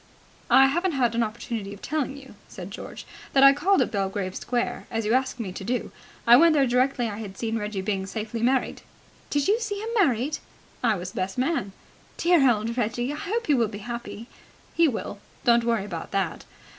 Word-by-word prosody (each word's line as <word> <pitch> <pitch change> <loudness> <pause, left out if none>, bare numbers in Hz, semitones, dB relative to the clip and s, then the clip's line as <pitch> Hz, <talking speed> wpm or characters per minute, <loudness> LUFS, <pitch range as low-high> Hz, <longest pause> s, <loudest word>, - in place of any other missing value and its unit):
"I 270 - +7
haven't 345 +6 +1
had 245 -4 +1
an 235 - +1
opportunity 215 -2 -4
of 200 - -17
telling 285 -2 -2
you," 270 -1 -13
said 185 +1 -9
George, - - -8 0.3
"that 270 - +5
I 275 0 +9
called 370 +7 +3
at - - -5
Belgrave 195 -2 -2
Square, 245 -1 -2
as 225 -2 -2
you 215 - +1
asked 260 0 0
me 205 -5 -4
to 190 - -7
do. 245 +4 -2 0.3
I 235 +1 +8
went 330 +3 +6
there 280 -2 +4
directly 250 0 +1
I 210 -1 -5
had 195 -3 -8
seen 225 -1 -2
Reggie 210 -2 -3
Byng 195 -1 -2
safely 220 +2 -4
married." 255 +2 +1 0.5
"Did 290 -1 0
you 425 +3 +3
see 420 -3 -3
him 440 +2 -4
married?" 300 - +1 0.4
"I 225 -3 +3
was 180 0 -6
best 190 +3 -3
man." 255 - 0 0.5
"Dear 335 -6 +4
old 225 +1 -2
Reggie! 240 +4 -1
I - - -4
hope 430 +10 -2
he 300 - +3
will 235 -4 +3
be 205 0 -7
happy." 235 -1 -6 0.5
"He 335 -1 +4
will. 220 -5 -4 0.2
Don't 235 -1 +4
worry 230 -4 +1
about 170 -5 -6
that. 195 -3 -2
235 Hz, 205 wpm, -25 LUFS, 210-275 Hz, 0.5 s, I